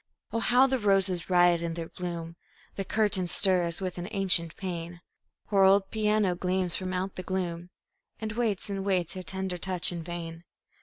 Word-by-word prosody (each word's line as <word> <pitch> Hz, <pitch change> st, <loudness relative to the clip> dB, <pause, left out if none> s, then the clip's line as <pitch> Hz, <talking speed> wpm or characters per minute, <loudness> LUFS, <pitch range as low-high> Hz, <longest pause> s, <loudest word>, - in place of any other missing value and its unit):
Oh, 230 Hz, -, +1 dB
how 245 Hz, +3 st, +5 dB
the 265 Hz, -1 st, 0 dB
roses 195 Hz, -4 st, +2 dB
riot 175 Hz, -1 st, +4 dB
in 165 Hz, -1 st, -3 dB
their 165 Hz, -1 st, -5 dB
bloom! 170 Hz, -2 st, -6 dB, 0.4 s
The 195 Hz, -, -2 dB
curtains 195 Hz, -3 st, 0 dB
stir 185 Hz, -2 st, +3 dB
as 170 Hz, +2 st, -3 dB
with 185 Hz, -1 st, -4 dB
an 175 Hz, -, -5 dB
ancient 185 Hz, -5 st, +1 dB
pain; 175 Hz, -2 st, -6 dB, 0.5 s
Her 195 Hz, -2 st, +4 dB
old 195 Hz, 0 st, +4 dB
piano 210 Hz, -3 st, +1 dB
gleams 180 Hz, 0 st, -1 dB
from 185 Hz, 0 st, -3 dB
out 185 Hz, +1 st, -3 dB
the -, -, -3 dB
gloom 180 Hz, -2 st, -3 dB, 0.5 s
And 220 Hz, -1 st, -4 dB
waits 220 Hz, -3 st, -1 dB
and 195 Hz, -1 st, -3 dB
waits 185 Hz, -4 st, 0 dB
her 185 Hz, -, -6 dB
tender 185 Hz, +1 st, -4 dB
touch 185 Hz, -1 st, +4 dB
in 170 Hz, -1 st, -5 dB
vain. 165 Hz, 0 st, -7 dB
185 Hz, 185 wpm, -28 LUFS, 175-195 Hz, 0.5 s, how